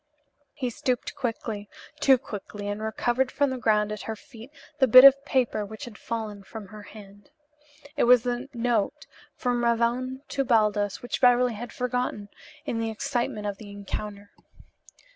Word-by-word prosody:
He 255 -5 -3
stooped 250 +1 -2
quickly 225 -5 -4 0.3
too 265 -1 +6
quickly 205 -3 -7
and 205 +1 -3
recovered 240 +4 0
from 285 -2 +1
the 260 - -4
ground 210 -2 +2
at 210 - -5
her 220 - -2
feet 230 +2 -14 0.3
the 265 - +5
bit 255 +2 +10
of 275 0 +8
paper 245 -6 +1
which 215 +1 -8
had 240 -3 -10
fallen 215 -3 -5
from 200 0 -10
her 215 +1 -10
hand. 205 -1 -14 0.7
It - - +2
was 245 -1 +6
the 245 +2 -3
note 235 -4 -1 0.3
from 245 -1 -1
Ravone 240 +3 0
to 275 - 0
Baldos 210 -5 +1
which 245 - -4
Beverly 245 -1 +5
had 235 +3 -7
forgotten 250 -4 -2 0.4
in 230 - -2
the 225 0 -1
excitement 235 -2 -2
of 200 -1 -3
the 210 - -10
encounter. 205 0 -6
230 Hz, 160 wpm, -26 LUFS, 210-250 Hz, 0.7 s, bit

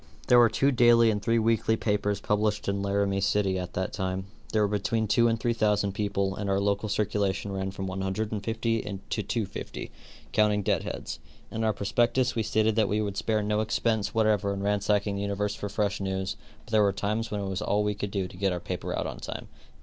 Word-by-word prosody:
There 125 - +8
were 120 -1 +7
two 140 +5 +2
daily 120 -2 +5
and 105 -1 -2
three 115 +2 +2
weekly 110 0 +2
papers 105 -2 0
published 105 +1 0
in 100 0 0
Laramie 100 0 0
City 95 -1 +1
av 90 -1 -5
that 95 0 -2
time. 95 -1 -2 0.3
There 110 -1 +3
were - - +3
between 110 +2 0
two 120 +3 +4
and 115 -1 +1
three 120 +1 +1
thousand 105 -3 +1
people 100 -1 -1
and 100 -1 -3
our 95 0 +2
local 100 +2 0
circulation 100 -1 0
ran 95 0 -2
from 95 0 -5
150 110 +4 -2 0.3
to 110 - -1
250, 105 0 -4 0.4
counting 105 -1 +3
dead - - +1
heads. - - -5 0.3
In 110 - -2
our 110 - +3
prospectus 120 +5 +1
we 115 - 0
stated 110 0 +1
that 110 -3 +3
we 105 - +1
would 100 -2 -2
spare 110 0 0
no 105 +1 0
expense 110 0 0
whatever 105 -2 +2
in 100 - -4
ransacking 105 0 +1
the - - -2
universe 100 0 -1
for 100 - -5
fresh 100 0 -1
news, 95 0 -2 0.3
but - - -15
there 110 -1 +5
were 100 -1 +4
times 105 +3 -2
when 105 - -2
it 100 - -3
was 95 +1 -3
all 105 0 +1
we 105 0 0
could 105 0 -4
do 95 -2 -2
to 90 - -13
get 95 0 +1
our 90 - -2
paper 90 0 -4
out - - -1
on - - -5
time. - - -7
105 Hz, 220 wpm, -28 LUFS, 100-110 Hz, 0.4 s, There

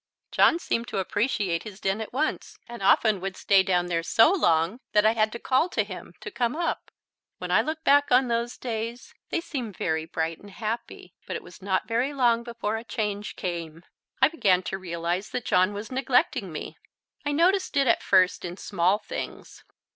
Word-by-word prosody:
John - - +5
seemed 235 -8 -2
to - - -4
appreciate 195 -3 0
his 210 -3 -10
den 195 +2 -1
at 220 - -6
once, 295 +5 -2
and 235 -3 -9
often 200 0 +4
would 195 0 -4
stay 195 -1 +4
down 180 -2 +1
there 170 -1 -1
so 225 - +5
long 170 - +2
that 210 0 +4
I 220 - +6
had 220 -1 +1
to - - -4
call 260 +8 +1
to 215 - 0
him 185 -3 -9
to - - -7
come 240 +2 -1
up. 335 +1 -2 0.5
When - - -5
I - - +5
look 315 0 -4
back 285 0 +4
on 250 +1 +5
those 235 0 -1
days 230 0 -5 0.2
they - - 0
seem 265 -9 -5
very 160 -3 -2
bright 165 0 -3
and 205 - -13
happy. 220 -3 -5
But - - -4
it - - -5
was 175 +3 -14
not 190 -1 -1
very 240 +5 0
long 240 -3 +3
before 235 -2 -3
a 225 - -7
change 210 -2 -3
came. 170 -2 -5 0.4
I 265 - +7
began 195 - +2
to 190 - -4
realize 175 +1 -3
that 250 -2 -4
John 185 +2 +3
was 205 +3 -7
neglecting 260 +2 +1
me. - - -7 0.4
I 290 - -1
noticed 350 +2 +2
it 275 - +4
at 230 - +3
first 185 -2 +3
in 175 +1 -6
small 190 0 +1
things. - - -7
215 Hz, 200 wpm, -26 LUFS, 185-245 Hz, 0.5 s, I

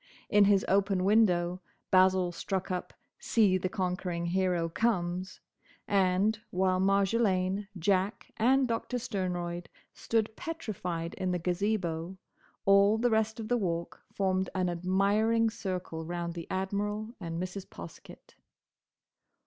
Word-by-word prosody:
In 205 -1 +6
his 195 -1 +3
open 195 -1 +2
window 185 -4 +3 0.3
Basil 185 -1 +4
struck 190 +2 -3
up 180 -1 -3 0.3
"See 200 -5 +3
the 185 - -2
Conquering 180 -3 -2
Hero 180 -1 +1
Comes," 180 -1 -1 0.5
and, 195 +2 +2
while 185 0 +1
Marjolaine, 195 0 +1
Jack 190 +4 0
and 260 +3 +3
Doctor 235 +2 -2
Sternroyd 180 -6 -3 0.3
stood 220 -1 -1
petrified 180 - -4
in 185 - -1
the 180 - 0
Gazebo, 180 -1 -2 0.5
all 200 +2 +5
the 240 +1 +1
rest 220 0 +1
of 220 - -5
the 245 +1 +2
Walk 170 -3 -3
formed 190 -1 0
an 185 -1 +1
admiring 200 +6 +2
circle 180 -6 -4
round 170 0 -4
the 170 -1 -7
Admiral 205 +3 -2
and 165 -3 -4
Mrs. 185 +1 -5
Poskett. 85 0 -12
190 Hz, 125 wpm, -30 LUFS, 180-210 Hz, 0.5 s, In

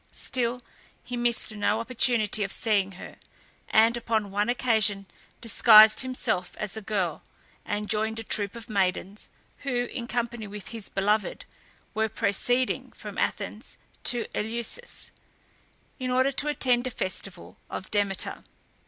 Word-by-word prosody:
Still 250 -1 -2 0.4
he 245 - -5
missed 240 -1 +1
no 210 +1 +1
opportunity 230 -3 +2
of 195 - -3
seeing 200 -4 +1
her, 180 - -10 0.5
and, 225 +2 +5
upon 220 -4 -1
one 205 +3 0
occasion, 220 -5 +1 0.4
disguised 220 -1 +7
himself 240 -8 -2
as 210 -1 -4
a 220 - -5
girl, 195 -6 -1 0.4
and 210 0 -2
joined 220 +2 0
a 225 - -4
troop 205 -1 -2
of 230 -1 -9
maidens, 195 -1 -1 0.3
who, 245 -3 -1
in 240 -3 -5
company 235 -2 -2
with 205 0 -8
his 225 -4 -7
beloved, 205 +1 0 0.5
were 220 0 0
proceeding 245 +5 0
from - - -7
Athens - - -3 0.3
to 240 -2 +5
Eleusis, 235 - -3 0.9
in 255 -1 -2
order 260 +2 +3
to 275 +2 +1
attend 255 -4 +2
a - - -1
festival 190 -4 -5
of 185 - -6
Demeter. 200 -2 -1
220 Hz, 135 wpm, -27 LUFS, 205-240 Hz, 0.9 s, disguised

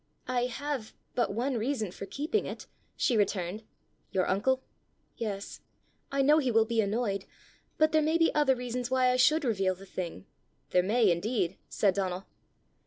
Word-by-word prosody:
"I 245 -1 +1
have 260 -2 -4 0.2
but 240 - +1
one 245 +5 -1
reason 225 -4 -1
for 195 - -8
keeping 310 +10 -1
it," - - -7 0.3
she 245 - +1
returned. 200 -1 0 0.5
"Your 185 -2 0
uncle?" 260 +8 +1 0.5
"Yes; 200 -3 -5 0.5
I 275 0 +2
know 300 +3 +6
he 265 -4 0
will 225 -1 +4
be 225 0 +1
annoyed. 200 -2 -1 0.5
But 310 0 +4
there 310 0 +4
may 315 +2 +2
be 330 -1 +3
other 290 -3 +3
reasons 245 0 -3
why 255 -1 +3
I - - +2
should 300 +4 +4
reveal 195 -5 +1
the 195 +2 -13
thing." 170 - -6 0.5
"There 180 - +5
may 210 +2 +3
indeed!" 190 0 0
said 200 -3 +2
Donal. 185 -1 -2
230 Hz, 170 wpm, -30 LUFS, 195-265 Hz, 0.5 s, know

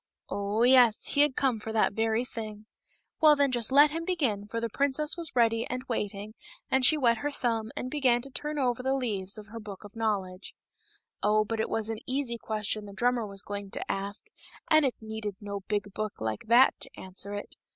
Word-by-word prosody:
Oh, 205 +3 -1
yes, 245 -3 +6
he 285 - +4
had 295 -3 +3
come 255 -5 +1
for 220 +1 -6
that 220 -2 +2
very 225 +2 0
thing. 220 -3 -6
Very 210 +1 -18 0.5
well, 305 -3 +7
then, 280 -2 +2
just 240 -1 +3
let 290 +2 +7
him 330 +2 -3
begin, 265 - -1
for 230 +2 -3
the 230 - -1
princess 280 +5 0
was 335 -5 -2
ready 230 -1 +3
and 255 +1 -3
waiting, 210 -2 -3 0.4
and 265 0 +3
she 310 +5 +6
wet 235 -5 +3
her 290 - -1
thumb, 230 -5 -2
and 255 - -4
began 255 -5 +2
to 275 - -9
turn 300 +3 -4
over 250 -3 0
the 265 +1 0
leaves 210 -6 -2
of 210 - -9
her 230 - -7
Book 210 -2 -9
of 205 +1 -13
Knowledge. 200 -4 -3 0.7
Oh, 215 +1 +3
it 225 0 -2
was 225 0 -1
an 220 - -4
easy 255 -3 -1
question 215 -1 -2
the 200 - -10
drummer 240 +2 +1
was 195 -1 -4
going 205 -1 -6
to - - -4
ask, 200 +1 -4 0.5
and 310 -1 +6
it 260 - 0
needed 220 -2 -5
no 200 -2 -5
big 205 -1 -2
book 215 0 -3
like 110 -1 -3
that 240 +3 +6
to - - -9
answer 190 +2 -6
it. 205 - -7
225 Hz, 215 wpm, -28 LUFS, 205-260 Hz, 0.7 s, well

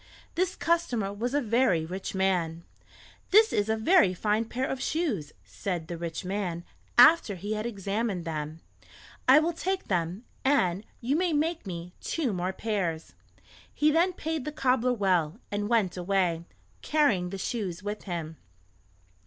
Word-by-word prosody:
This 365 +2 0
customer 245 -12 0
was 240 +6 -2
a 290 - +3
very 225 - +2
rich 190 +3 -5
man. 175 -4 0 0.7
"This 435 +3 +6
is 205 +1 +1
a 220 - +3
very 220 - +4
fine 215 +4 +1
pair 250 +3 -2
of 265 -1 -3
shoes," 270 - -1
said 160 - -4
the 170 - -4
rich 165 +1 -5
man 180 -3 -2 0.3
after 245 -4 +7
he 205 +4 -4
had 215 +2 -2
examined 200 -3 -2
them. 155 0 -4 0.7
"I 260 +3 +8
will 325 +3 +3
take 375 +3 -3
them, 180 +3 -1 0.2
and 200 -9 +2 0.2
you 255 +4 0
may 350 0 +1
make 310 - 0
me 175 -1 -6
two 280 -10 -1
more 180 0 -1
pairs." 190 -6 -3 0.6
He 300 +1 +2
then 345 +4 +3
paid 320 -3 -3
the 300 - -4
cobbler 255 -4 +2
well, 185 -6 +1
and 205 +1 -2
went 215 -7 +2
away, 180 -2 0 0.4
carrying 230 -13 +2
the 195 - -5
shoes 190 -3 -3
with 210 +1 -5
him. 165 -4 -5
205 Hz, 155 wpm, -28 LUFS, 180-265 Hz, 0.7 s, I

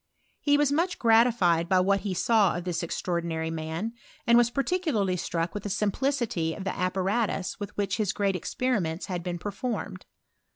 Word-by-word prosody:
He 290 -1 +3
was 290 -1 +2
much 335 +5 +1
gratified 225 -8 +4
by 185 -1 +4
id 195 +2 +3
he 195 -1 -3
saw 205 -2 +3
of 175 - -5
this 175 -2 -2
extraordinary 170 -1 -2
man, 165 +7 -4 0.3
and 235 - +5
was 240 -1 +5
parti 280 +9 0
larly 210 - 0
struck 165 +1 -2
with 205 - -4
the 205 - -5
simplicity 210 - 0
of 195 - -6
the 195 - -1
appatri 195 +2 -1
with 205 -2 -7
which 200 0 0
his 210 -3 +1
great 200 -2 0
experiments 180 -4 -1
had 180 -2 -3
been, 175 0 -4
f 205 - -2
formed. 205 -4 -4
200 Hz, 180 wpm, -27 LUFS, 175-235 Hz, 0.3 s, and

